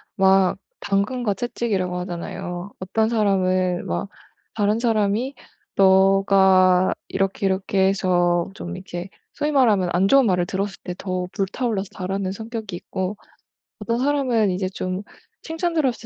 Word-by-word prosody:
막 190 -1 +4 0.2
당근과 205 +2 0
채찍이라고 195 -6 -2
하잖아요. 180 +1 -5
어떤 220 +4 0
사람은 185 -4 +1
막 200 - -3 0.5
다른 210 +1 +1
사람이 225 +3 0 0.4
네가 190 -1 +5
이렇게 195 +1 -1
이렇게 190 0 +1
해서 175 -2 +1
좀 180 -3 -7
이렇게 180 0 -7 0.2
소위 300 +1 -1
말하면 215 -10 +3
안 185 +2 +3
좋은 275 0 +5
말을 180 -3 +2
들었을 195 +2 -3
때 180 - -4
더 185 -2 -3
불타 200 +6 -2
올라서 205 -4 -1
잘하는 190 0 -3
성격이 220 -2 -6
있고 190 +3 -4 0.6
어떤 230 +3 -1
사람은 255 -7 +2
이제 185 +1 -1
좀 185 0 -4 0.4
칭찬 330 +1 -2
들었을 270 -8 0
195 Hz, 295 characters per minute, -22 LUFS, 185-220 Hz, 0.6 s, 네가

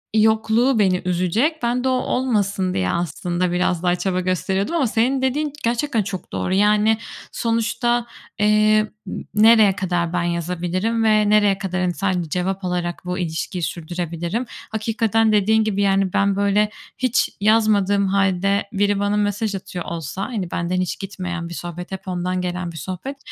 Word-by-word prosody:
yokluğu 220 +3 +3
beni 185 -3 +2
üzecek. 185 - 0
Ben 245 +1 0
de - - +1
o - - +2
olmasın 210 -7 0
diye 90 -1 0
aslında 175 +2 -1
biraz 180 -1 0
daha 175 0 +3
çaba 185 0 -1
gösteriyordum 190 - -1
ama 290 -7 +2
senin 250 +4 +1
dediğin 285 +3 0
gerçekten 235 0 0
çok 185 -1 -6
doğru. 185 - -1
Yani 210 +2 +3 0.3
sonuçta, 235 +1 0 0.3
eee, 215 0 +4 0.3
ı - - -5 0.2
nereye 215 -2 +6
kadar 175 -3 -1
ben 175 -1 0
yazabilirim 180 +6 -1
ve 215 -1 +3
nereye 205 -2 +4
kadar, 185 -2 -3
hani, 180 -1 0
sadece 180 -4 -1
cevap 185 +3 -2
alarak 175 -1 -2
bu 180 +1 -3
ilişkiyi 170 +1 -3
sürdürebilirim? 170 - -3 0.3
Hakikaten 225 0 +1
dediğin 215 +2 +3
gibi, 200 -2 -1
yani, 195 -1 +2
ben, 200 0 +2
böyle, 200 +1 +2 0.3
hiç 255 -2 +1
yazmadığım 205 -2 +3
hâlde 195 0 +1
biri 205 0 +1
bana 205 +1 +1
mesaj 205 0 0
atıyor 180 -2 -6
olsa, 170 +3 -5
hani, 200 -8 -4
benden 180 +2 -1
hiç 180 - -3
gitmeyen 180 -3 -5
bir - - -7
sohbet, 175 +1 -7
hep 190 0 -7
ondan 180 0 -2
gelen 180 -1 -3
bir 165 - -10
sohbet, 185 - -6
195 Hz, 160 wpm, -21 LUFS, 180-220 Hz, 0.3 s, nereye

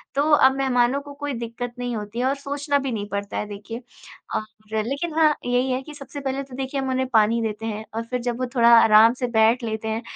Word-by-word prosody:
तो 290 +2 +2
अब 265 -2 +6
मेहमानों 260 -1 +2
को 285 0 -11
कोई 285 0 -4
दिक़्क़त 235 +1 -5
नहीं 245 -1 -3
होती 210 +2 -5
है 250 - +1
और 270 +2 +1
सोचना 285 +1 -1
भी 270 -1 -3
नहीं 205 -3 -3
पड़ता 200 +1 -4
है - - -2
देखिए। 210 +4 -8 0.5
और 215 - 0 0.4
लेक़िन 285 +6 -3
हाँ, 310 -2 +5
यही 250 +1 +1
है 255 +1 -1
कि 300 +2 -10
सबसे 285 0 -9
पहले 270 0 -2
तो 265 -2 -11
देखिए 270 +1 -3
हम 265 - -2
उन्हें 260 0 0
पानी 225 +1 +4
देते 220 0 -3
हैं 215 0 -4
और 230 - -2
फ़िर 250 +1 -3
जब 240 -1 -2
वो 255 - 0
थोड़ा 235 -1 +5
आराम 220 +1 +6
से 250 - 0
बैठ 230 +1 +3
लेते 220 -1 -3
हैं 220 +1 -2
245 Hz, 240 wpm, -23 LUFS, 225-275 Hz, 0.5 s, अब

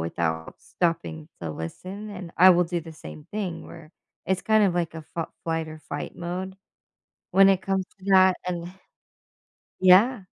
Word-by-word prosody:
without 80 -1 -3
stopping 165 -2 -2
to 85 - -4
listen, 185 - -7
and 180 -4 -8
I 185 +2 +8
will 180 0 +4
do 170 0 -2
the 165 0 -10
same 155 -1 -11
thing 190 -6 -4
where 165 -2 -12 0.4
it's 190 +1 0
kind 220 -1 +4
of 185 - +2
like 170 -2 -1
a 160 - -7
fal 165 +2 -6
flight 165 -1 -2
or 155 0 -9
fight 145 -1 -6
mode 185 +2 -5 0.8
when 195 +1 +7
it 190 -1 +3
comes 190 -1 -1
to 190 - -14
that, 185 -1 +6
an 175 -1 -4 1.1
Yeah. 195 +5 +5
175 Hz, 170 wpm, -25 LUFS, 160-190 Hz, 1.1 s, I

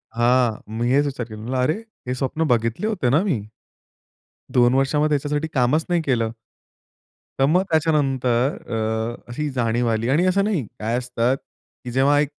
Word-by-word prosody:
हां, 120 0 +3 0.3
मी 120 +1 0
हेच 145 +2 +4
विचार 130 -4 -3
केला. 110 -1 -10
म्हटलं, 130 +3 -3
"अरे! 140 +5 +2 0.3
हे 125 - 0
स्वप्न 135 +5 -1
बघितले 115 - 0
होते 180 - 0
ना 150 +7 +4
मी? 165 - 0 1.2
2 120 +1 +5
वर्षामध्ये 145 +3 +2
ह्याच्यासाठी 145 +2 -1
कामच 135 +5 +2
नाही 175 -1 +2
केलं." 115 -6 0 1.1
तर 135 - +5
मग 175 +6 +3
त्याच्यानंतर 135 -5 +1 0.2
अ, 110 +1 -2
अशी 150 +4 -3
जाणीव 120 0 +1
आली. 115 +2 0
आणि 160 +7 +3
असं 195 +2 +3
नाही, 190 - 0
काय 115 +3 -1
असतं, 125 +1 0
की 125 -2 -14
जेव्हा 140 +3 +3
एक 145 -1 +1
130 Hz, 165 wpm, -22 LUFS, 120-150 Hz, 1.2 s, 2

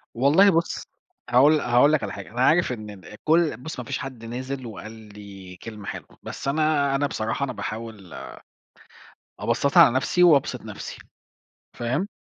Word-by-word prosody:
والله 145 +11 +5
بُصّ، 165 -2 0 0.5
هاقول 135 +6 +5
لَ - - -2
هاقول 125 +4 +4
لّك 155 - +1
على 100 -1 -4
حاجة، 100 - -8
أنا 120 +2 -3
عارف 160 +3 +4
إن 110 -4 -5
ن 95 - -12
كلّ 165 0 +2
بُصّ 145 +2 -7
ما 125 - -6
فيش - - -3
حد 130 -4 -8
نازل 130 +3 -5
وقال 110 -1 -8
لي 100 -4 -12
كلمة 105 +2 -10
حلوة، - - -8
بس - - -7
أنا 145 -1 +2
أنا 145 +1 +1
بصراحة 110 +2 -3
أنا 135 -2 -2
باحاول 110 -6 -7 1.3
أبسَّطها 140 +5 +4
على 130 -5 +3
نفْسي 180 +7 +2
وأبسِط 155 -6 +4
نفْسي، - - -8 0.8
فاهم؟ 130 +11 -2
125 Hz, 165 wpm, -24 LUFS, 110-150 Hz, 1.3 s, والله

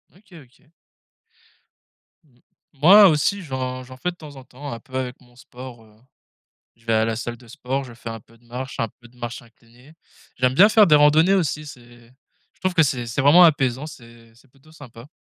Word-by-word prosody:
OK, 185 -4 -17
OK. 130 +1 -22 1.6
Mmh. 125 -5 -31 0.3
Moi 190 +8 +7
aussi 160 +6 0
j'en 130 -4 -5
j'en 130 0 -13
fais 180 +7 -3
de - - -17
temps 150 -4 -13
en 135 - -12
temps 140 +3 -10
un 115 - -7
peu 130 +3 -15
avec 125 -1 -4
mon 120 -1 -23
sport, 125 -2 -12
heu, 105 -1 -23 0.8
je 115 0 -29
vais 115 - 0
à 110 0 +2
la 115 0 -2
salle 120 +1 -6
de 120 -1 -19
sport, 135 +4 -4
je 120 -2 -12
fais 115 0 -9
un 115 0 -7
peu 115 +3 -24
de 120 - -29
marche, 130 +3 -8
un 115 - 0
peu 120 - -15
de 125 +1 -25
marche 120 +2 -7
inclinée 120 +4 -22 0.4
j'aime 125 +1 +1
bien 200 +9 +6
faire 215 -2 +5
des 150 - +6
randonnées 155 +5 +4
aussi 150 -5 -1
c'est 120 -3 -15 0.4
je - - -35
trouve 185 -1 -1
que 165 -3 +4
c'est 125 -4 -2
c'est 115 +5 -2
vraiment 155 +6 +6
apaisant 135 -3 +2
c'est 115 -4 -15
c'est 130 +2 -25
plutôt 140 +4 -24
sympa. 130 -4 -14
130 Hz, 215 wpm, -21 LUFS, 120-150 Hz, 1.6 s, Moi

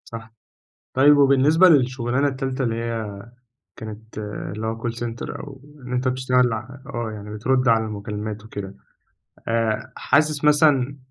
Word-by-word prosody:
صح. 115 -1 -9 0.6
طيب 145 +3 +6
وبالنسبة 145 +6 +5
للشُغلانة 130 -2 +2
التالتة 135 -1 -2
اللي 115 -2 0
هي 115 -2 -3 0.6
كانت 110 0 -9
اللي 105 +1 -5
هو 115 0 -3
call 120 - -1
center 120 0 -5
أو 140 -3 -10 0.3
إن 125 - -6
أنت 125 +1 0
بتشتغل 125 -1 +2
ع 110 +2 -4 0.3
آه، 120 -1 -2
يعني 105 0 -8
بترُد 125 +4 +1
على 115 -1 +4
المكالمات 105 0 -5
وكده، 100 -3 -7 0.7
آآ 115 -1 -1
حاسِس 150 +1 +1
مثلًا 145 -3 +4
120 Hz, 140 wpm, -22 LUFS, 110-135 Hz, 0.7 s, طيب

